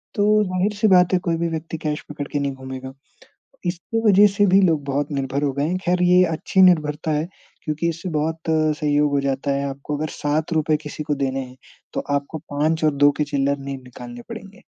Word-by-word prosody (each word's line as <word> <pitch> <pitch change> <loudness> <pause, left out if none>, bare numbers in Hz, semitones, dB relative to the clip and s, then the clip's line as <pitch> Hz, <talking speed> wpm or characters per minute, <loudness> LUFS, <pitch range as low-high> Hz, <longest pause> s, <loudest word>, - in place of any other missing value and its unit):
तो 210 0 +3
ज़ाहिर-सी 200 +3 0
बात 180 -1 +5
है 185 - +4
कोई 170 -2 -1
भी 170 - -1
व्यक्ति 160 0 -5
कैश 150 -1 -3
पकड़ 145 -1 -5
के 145 - -2
नहीं 140 -1 -1
घूमेगा। 130 0 -8 0.7
इसकी 180 +6 -2
वजह 205 +1 +7
से 205 0 +2
भी 190 +1 +5
लोग 160 -5 +2
बहुत 140 +1 -2
निर्भर 140 +1 -2
हो 140 -2 +1
गए 140 +2 -1
हैं, 180 +3 -1
ख़ैर 180 0 +2
ये 180 +1 +5
अच्छी 165 +3 +1
निर्भरता 155 -3 +3
है 155 +3 -1 0.4
क्योंकि 155 +2 -1
इससे 170 +3 -4
बहुत 160 +2 -1
सहयोग 150 -2 +2
हो 140 - +2
जाता 140 +1 -1
है, 140 0 0
आपको 140 +2 -5
अगर 155 +1 -3
₹7 155 +1 0
किसी 150 0 -6
को 150 -1 0
देने 135 -1 -1
हैं, 130 0 -9 0.4
तो - - 0 0.2
आपको 140 +3 -4
5 155 +2 -1
और 150 - +3
2 145 +1 +5
के 150 - +2
चिल्लर 140 -1 0
नहीं 135 0 -6
निकालने 120 -1 -10
पड़ेंगे। 195 +1 -10
150 Hz, 210 wpm, -22 LUFS, 140-175 Hz, 0.7 s, वजह